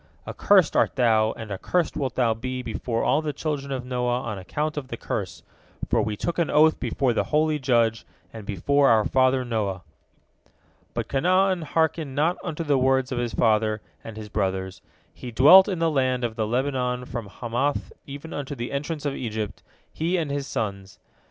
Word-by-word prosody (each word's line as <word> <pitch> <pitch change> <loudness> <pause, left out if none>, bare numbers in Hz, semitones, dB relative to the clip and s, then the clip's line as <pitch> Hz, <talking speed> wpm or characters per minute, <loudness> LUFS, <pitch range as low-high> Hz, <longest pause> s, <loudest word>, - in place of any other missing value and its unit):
Accursed 190 -6 +3
art - - +2
thou, 110 -4 +3
and 110 -2 -9
accursed 165 - -1
wilt 135 -4 -2
thou 120 -3 +2
be 125 +3 -5
before 115 0 -2
all 150 - +2
the 155 -1 -2
children 145 -3 -3
of 130 -2 -3
Noah 125 -1 -1
on 110 -5 -5
account 150 +11 -3
of 145 -3 -5
the 115 - -6
curse, 90 -8 -4 0.4
for - - +2
we 105 -1 -2
took 170 +8 -2
an 170 - +1
oath 155 +1 +4
before 130 -4 0
the - - 0
holy 155 0 +1
Judge 115 -4 +2 0.3
and 110 -2 -8
before 135 +9 +2
our 110 -2 +4
father 130 0 +2
Noah." 100 -6 -2 1.1
But - - -2
Canaan 185 +5 +2
hearkened 160 -2 -1
not 160 +5 +1
unto 165 -1 -4
the 145 -4 +2
words 130 0 +2
of 125 - -1
his 120 -1 -2
father 110 -1 +2 0.2
and 115 -1 -9
his 110 -1 -7
brothers. 95 -1 -2 0.3
He 125 - -8
dwelt 150 - +8
in 190 -3 -2
the 165 -1 +1
land 130 -3 +1
of 115 -2 -2
the 110 -2 -1
Lebanon 125 0 -1
from 120 -4 -6
Hamath 120 +7 -2
even 145 +4 -8
unto 145 0 -5
the 120 -1 -5
entrance 145 +2 -4
of 145 - 0
Egypt, 110 -5 -4 0.3
he 170 +4 0
and 155 -4 -2
his 140 -1 -3
sons. 100 -2 -4
130 Hz, 185 wpm, -25 LUFS, 115-150 Hz, 1.1 s, dwelt